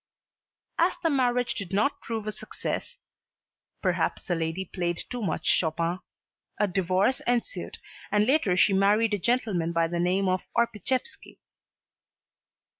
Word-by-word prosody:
As - - +3
the 330 - +3
marriage 250 -3 +1
did 195 -3 -6
not 210 +8 +1
prove 225 -2 -4
a 215 - -2
success - - -5 0.9
perhaps - - 0
the 180 - -1
lady 165 +3 -2
played 175 -1 -2
too 245 +6 -5
much 200 - -2
Chopin 170 +2 +1 0.6
a 210 - +4
divorce 190 +6 +1
ensued 245 - -1 0.3
and 210 0 +3
later 240 -9 +2
she 200 - +5
married 205 +3 +3
a 205 - +1
gentleman 200 -6 0
by 165 -1 +2
the 170 +1 -3
name 185 +3 +2
of 185 0 +1 0.2
Orpiszewski. 235 - -1
200 Hz, 135 wpm, -27 LUFS, 180-235 Hz, 0.9 s, she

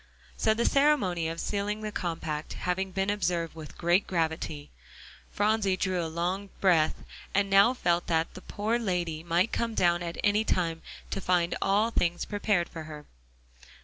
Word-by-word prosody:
So 220 - +2
the 235 - 0
ceremony 250 - +3
of 165 +1 -4
sealing 205 +1 -2
the 215 -1 -4
compact 160 -5 -3
having 190 +1 -2
been 195 +2 0
observed 175 -4 -1
with 155 -2 -10
great 175 +3 +2
gravity, 160 -4 -2 0.6
Phronsie 205 -2 +1
drew 185 -2 0
a 165 - -3
long 180 +5 -2
breath, 170 -5 +3 0.3
and 200 0 +2
now 200 +6 +6
felt 175 -6 +1
that 160 -1 0
the 185 - -10
"poor 220 +5 -1
lady" 175 -7 -2
might 175 +5 +1
come 230 -1 -1
down 175 -2 +3
at 170 -1 -5
any 210 +1 +3
time 165 -6 0 0.3
to 195 - -2
find 175 -1 +1
all 210 +4 +2
things 175 -5 0
prepared 205 -4 0
for 160 -2 -8
her. 150 -1 -9
180 Hz, 165 wpm, -28 LUFS, 170-205 Hz, 0.6 s, now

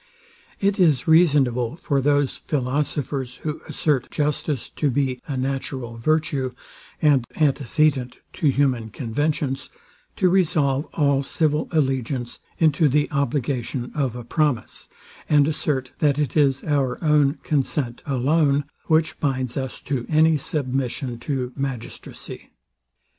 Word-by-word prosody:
It 200 0 +1
is 155 -7 +3
reasonable 140 -7 +4
for 140 -4 0
those 145 0 +2
philosophers, 135 -1 -2
who 155 -1 -3
assert 145 -5 0
justice 150 -2 -1
to 150 - 0
be 130 -1 -1
a 140 - -3
natural 130 -2 -3
virtue, 145 0 0 0.5
and 145 -5 +5
antecedent 140 -2 +1 0.2
to 155 -5 +1
human 130 -5 +1
conventions, 135 +4 -2 0.5
to 185 - +2
resolve 155 -6 +2
all 140 -3 +3
civil 150 +2 0
allegiance 130 -5 -1 0.2
into 155 -1 +3
the 145 +3 +1
obligation 130 -3 -1
of 135 -5 -1
a 120 - -6
promise, 140 -1 -1 0.4
and 145 -2 +5
assert 140 -4 -1
that 145 -2 +3
it 145 -5 -1
is 135 -3 +3
our 140 -4 0
own 150 -2 +4
consent 135 -4 -1
alone, 140 +2 +2 0.2
which 160 0 +1
binds 130 -4 -1
us 130 -2 -4
to 130 -4 -3
any 160 +1 +4
submission 130 -4 -2
to 130 -1 -3
magistracy. 130 -4 -6
140 Hz, 120 wpm, -23 LUFS, 130-150 Hz, 0.5 s, and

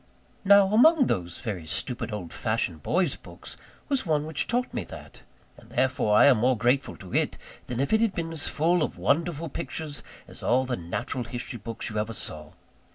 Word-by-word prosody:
Now, 200 0 +6
among 285 +5 +6
those 90 - -1
very 95 -9 -5
stupid 120 +7 -2
old 100 -5 -5
fashioned 80 -2 -1
boys' 175 - +1
books - - -9 0.3
was 275 -3 +1
one 150 -4 +1
which 160 -1 -1
taught 245 +1 0
me - - -2
that; - - -11 0.4
and - - -17
therefore 130 -5 +2
I - - +8
am 135 -4 +6
more 125 +2 +3
grateful 125 +5 +1
to 95 -2 -11
it - - +1 0.3
than 120 -1 -3
if 140 +9 0
it 220 - +4
had 225 -4 +1
been 165 -1 -3
as 160 -2 -2
full 170 +3 +2
of 150 - -2
wonderful 165 +1 0
pictures 155 -1 -5 0.3
as - - -7
all 130 +2 +2
the 125 -1 -1
natural 120 +7 -4
history 120 +1 -5
books 115 +1 -5
you 105 - -1
ever 110 +1 -2
saw. 75 -6 -4
130 Hz, 195 wpm, -27 LUFS, 110-170 Hz, 0.4 s, I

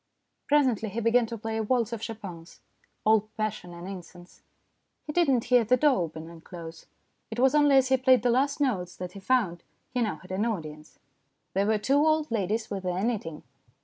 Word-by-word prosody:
Presently 255 -7 +2
he 220 - -4
began 230 +1 +3
to 230 - -5
play 225 +1 -4
a - - 0
waltz 235 +1 0
of 225 - -5
Chopin's, 190 -7 -8 0.5
all 215 -1 +3
passion 215 -4 -3
and 175 +1 -9
incense. 180 -2 -11 0.6
He 300 - -5
did 345 -3 +3
not 250 -4 +3
hear 245 -1 +4
the 250 +4 +3
door 285 +1 +4
open 160 -2 -4
and 165 -1 -13
close. 165 -2 -10 0.4
It 220 - -6
was 265 +2 +4
only 290 -2 +5
as 265 -1 +3
he 265 - +4
played 255 -1 +4
the 245 - +3
last 280 +4 +1
notes 190 -11 -1
that 180 -1 -6
he 195 - -10
found 195 -6 +1 0.3
he 250 - -1
now 215 -7 0
had 185 +4 -14
an 190 +3 0
audience. 155 -9 -5 0.6
There 195 +2 +1
were 220 0 +3
two 265 +7 +1
old 310 -2 +2
ladies 220 +1 -1
with 195 -1 -3
their 180 +1 -2
knitting. 200 -10 -3
220 Hz, 205 wpm, -27 LUFS, 180-255 Hz, 0.6 s, only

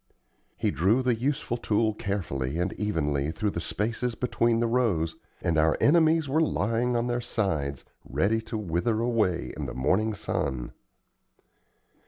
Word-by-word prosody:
He - - +1
drew 100 - +2
the 125 -1 +3
useful 120 0 -1
tool 110 -1 +1
carefully 80 -10 -3
and 90 +2 -1
evenly 75 -8 -1
through 105 +4 -1
the 85 - -4
spaces 115 +7 -2
between 115 -1 +1
the 120 - +2
rows, 105 -10 +1 0.3
and 80 -2 +2
our 80 0 +3
enemies 160 0 +4
were 150 +4 +2
lying 120 -3 +1
on 120 - 0
their 120 0 -1
sides 75 - -2 0.2
ready 110 +3 +1
to 110 0 -5
wither 105 +3 0
away 115 -7 0
in - - -4
the - - -6
morning 100 +12 +1
sun. 65 -9 -3
110 Hz, 150 wpm, -27 LUFS, 85-120 Hz, 0.3 s, enemies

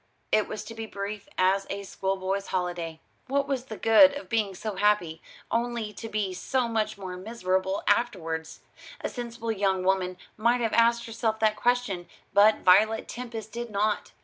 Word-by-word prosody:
It 215 -1 +3
was 215 - -5
to 230 - -9
be 225 0 -6
brief 200 0 -6
as 190 +1 +2
a 200 0 -4
schoolboy's 195 0 -2
holiday. 175 -3 -3 0.3
What 275 +1 +1
was 265 -2 -2
the 220 -5 -7
good 275 +6 +7
of 285 - -8
being 215 -4 0
so 215 +1 -5
happy, 195 -6 +2 0.3
only 230 -2 -1
to 225 - -7
be 205 -3 -1
so 255 +6 0
much 220 -2 -1
more 185 -2 -6
miserable 190 -2 -1
afterwards? 165 -8 0 0.4
A - - -2
sensible 235 -2 -4
young 195 -3 +1
woman 185 -1 +1 0.2
might 235 +3 +2
have 225 -2 0
asked 235 0 +4
herself 225 -1 -1
that 215 -1 +3
question, 220 -7 0 0.3
but 205 +2 +5
Violet 215 +5 +4
Tempest 230 -3 -7
did 240 0 -5
not. 210 0 0
215 Hz, 170 wpm, -27 LUFS, 190-230 Hz, 0.4 s, good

